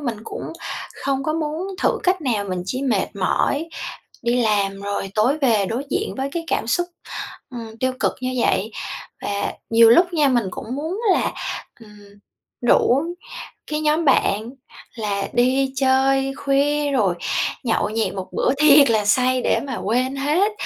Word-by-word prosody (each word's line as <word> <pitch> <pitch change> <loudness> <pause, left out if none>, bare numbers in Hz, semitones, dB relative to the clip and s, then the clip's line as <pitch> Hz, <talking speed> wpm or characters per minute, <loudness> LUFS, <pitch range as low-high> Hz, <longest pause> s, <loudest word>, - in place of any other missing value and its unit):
mình 240 -6 -3
cũng 440 - -6 0.5
không 275 -1 0
có 310 - 0
muốn 315 +3 -2 0.2
thử - - +2
cách 365 -1 +1
nào, 225 -7 0
mình 185 -2 -3
chỉ 255 +6 -2
mệt 230 -8 +1
mỏi 285 - 0 0.5
đi 240 +1 +2
làm 200 -3 +1
rồi 200 -1 -3
tối 245 +8 +2
về 225 -9 +2
đối 240 +7 -3
diện 420 +3 -1
với 270 +1 -2
cái 335 +1 -3
cảm 275 - -1
xúc, 350 +9 +1 0.6
ừm, 230 -3 -8
tiêu 260 0 +1
cực - - +2
như 255 0 -2
vậy. 215 +4 +1 0.5
Và 200 0 -2 0.2
nhiều 230 0 +7
lúc 350 +9 +5
nha, 300 -3 +4
mình 240 -4 +2
cũng 235 +7 -6
muốn 320 +8 -3
là, - - +1 0.5
ừm, 210 -2 -15 0.6
rủ 245 +2 +4 0.7
cái 305 0 -2
nhóm 305 +2 +2
bạn 220 -4 +2 0.5
là 205 -3 -2
đi 260 +2 +2
chơi 270 0 +2
khuya 285 +1 +1
rồi 205 -10 +2 0.5
nhậu 225 -3 +1
nhẹt 220 +1 -1
một 190 -1 -5
bữa - - +1
thiệt 290 -3 +7
là 215 -2 +2
say 255 +4 +3
để - - +2
mà 260 - -3
quên 250 +5 0
hết, 305 +10 +2
255 Hz, 165 wpm, -21 LUFS, 220-290 Hz, 0.7 s, nhiều